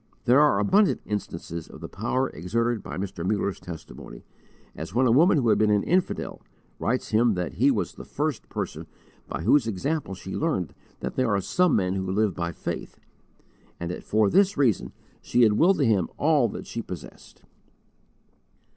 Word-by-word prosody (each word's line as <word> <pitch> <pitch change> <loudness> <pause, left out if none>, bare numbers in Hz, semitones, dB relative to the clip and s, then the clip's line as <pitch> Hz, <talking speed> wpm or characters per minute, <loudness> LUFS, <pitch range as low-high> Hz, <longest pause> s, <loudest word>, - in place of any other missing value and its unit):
There 125 +3 +5
are 150 -9 +4
abundant 190 - +3
instances 85 -5 -5
of - - -12
the - - -7
power 130 +5 -1
exerted 115 +7 -1
by - - -7
Mr. 95 -3 -4
Muller's 100 +1 -1
testimony, 80 -7 -10 0.5
as 80 +6 -7
when 130 +2 +4
a 120 - +4
woman 160 +7 +5
who 120 -5 +2
had - - +3
been 110 -1 +3
an 105 -1 +3
infidel, 180 +1 -1 0.4
writes 125 +4 -1
him 110 -1 +3
that 90 -2 -3
he - - +6
was - - -1
"the - - -10
first - - -3
person - - -5 0.4
by - - -5
whose 135 - +4
example 125 - -2
she 95 +1 -7
learned 150 - -1 0.3
that - - -5
there 130 -2 +2
are 100 -2 +2
some 180 - +2
men 95 -3 +1
who 95 -1 -2
live 105 +1 +1
by 85 -1 -3
faith," - - -6 0.8
and 85 0 -3
that - - -6
for 110 0 +2
this 195 - +3
reason 115 - +1 0.3
she 120 - +2
had 110 -2 +5
willed 180 - +4
to 140 - +2
him 100 -7 +2
all 145 -5 +3
that - - -7
she 115 - -5
possessed. 90 -7 -11
110 Hz, 180 wpm, -25 LUFS, 95-130 Hz, 0.8 s, he